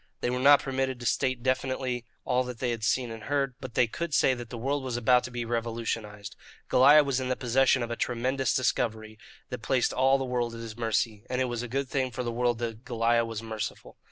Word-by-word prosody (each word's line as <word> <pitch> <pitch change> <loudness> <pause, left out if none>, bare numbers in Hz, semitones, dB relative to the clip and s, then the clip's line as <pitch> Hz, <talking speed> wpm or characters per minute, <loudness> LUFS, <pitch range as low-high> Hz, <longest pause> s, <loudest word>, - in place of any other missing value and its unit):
They 120 - 0
were 125 - -1
not 140 +2 +6
permitted 130 -1 -2
to 120 - -8
state 130 -1 0
definitely 130 -1 -1 0.2
all 125 0 +2
that 125 -1 -6
they 125 0 -1
had 115 -2 -4
seen 120 +1 +1
and 115 -1 -8
heard, 140 -2 0
but 130 -3 -8
they 125 - +5
could 155 +6 -3
say 130 - +4
that 120 -2 -7
the 120 - -6
world 135 +4 -1
was 125 -2 -3
about 125 +1 +4
to - - -6
be 120 -1 -4
revolutionized. 115 -3 -4 0.4
Goliah 145 +4 +7
was 135 -2 0
in 130 -1 -3
the 130 - +1
possession 130 +1 +2
of 120 - -5
a - - -1
tremendous 130 +3 -1
discovery 110 -4 -1 0.3
that 125 -2 -6
placed 125 +1 +1
all 135 +1 +4
the 135 - -3
world 120 -2 -2
at - - -8
his 115 -2 -7
mercy, 115 -2 -1
and 125 0 -1
it 130 - +2
was 120 -2 -3
a 125 - -5
good 135 +3 -2
thing 130 -1 -1
for 125 +1 -4
the 120 - -2
world 120 0 0
that 115 0 -5
Goliah 115 -1 +1
was 115 -1 -5
merciful. 110 -2 -6
125 Hz, 240 wpm, -28 LUFS, 115-130 Hz, 0.4 s, Goliah